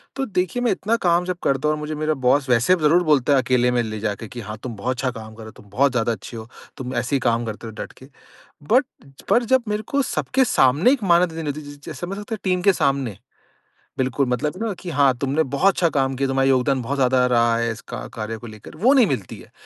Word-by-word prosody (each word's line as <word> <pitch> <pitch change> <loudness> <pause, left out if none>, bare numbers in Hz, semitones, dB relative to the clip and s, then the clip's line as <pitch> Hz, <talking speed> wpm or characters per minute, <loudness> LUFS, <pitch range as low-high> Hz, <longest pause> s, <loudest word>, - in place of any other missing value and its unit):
तो 270 - -1
देखिए 185 +1 -1
मैं 240 - +2
इतना 215 +4 0
काम 175 0 +3
जब 180 -1 -3
करता 135 +2 +1
हूँ 155 - +2
और 150 - -7
मुझे 150 0 -4
मेरा 155 +1 0
बॉस 130 0 +1
वैसे 125 +9 +4
ज़रूर 165 +4 +4
बोलता 145 -3 +3
है 135 - +5
अकेले 125 -1 +2
में 120 -1 +1
ले 110 -1 -5
जा 105 -1 -1
के 115 - -9
कि, 120 +3 -8
"हाँ 105 0 -7
तुम 120 -3 -5
बहुत 125 +5 -2
अच्छा 130 0 -1
काम 110 -2 -10
कर 115 - -12
रहे - - -10
हो, 110 - -10
तुम 105 - -20
बहुत 140 +5 +2
ज़्यादा 120 -2 0
अच्छे 115 +2 -7
हो, 110 - -8 0.3
तुम 130 0 -5
ऐसे 130 +3 -1
ही - - +2
काम 120 -2 0
करते 110 +1 -6
रहो 110 - -9
डट - - -11
के।" 130 - -14 0.7
बट 255 +3 +5 0.5
पर 240 - +4
जब 260 +1 +3
मेरे 210 +1 -1
को 280 - +3
सबके 260 0 0
सामने 155 - +4
एक 270 - -1
मान्यता 170 -2 +3
देनी 165 -2 -4
होती 150 +2 -6
है 145 0 -10
ज - - -24
जैसे 165 +2 -6
मतलब 200 +2 -6
एक 220 - -2
टीम 185 -2 +1
के 200 - +5
सामने। 135 - 0 0.8
बिल्कुल 130 +1 0
मतलब 130 +5 -1
है - - -8
ना 205 - -2
कि 180 - -7
हाँ, 140 -3 +4
तुमने 140 +4 0
बहुत 140 +9 +2
अच्छा 170 - +1
काम 135 -3 0
किया 135 +1 0
तुम्हारा 135 0 +2
योगदान 130 0 +2
बहुत 140 +4 -3
ज़्यादा 130 -1 +3
रहा 115 -1 +3
है 115 0 0
इस 115 +4 -8
का - - -3 0.2
कार्य 110 0 -4
को 120 - -10
लेकर 110 +5 -12
वो 245 - +4
नहीं 260 -4 +6
मिलती 125 - -4
है। - - -16
135 Hz, 270 wpm, -22 LUFS, 120-175 Hz, 0.8 s, नहीं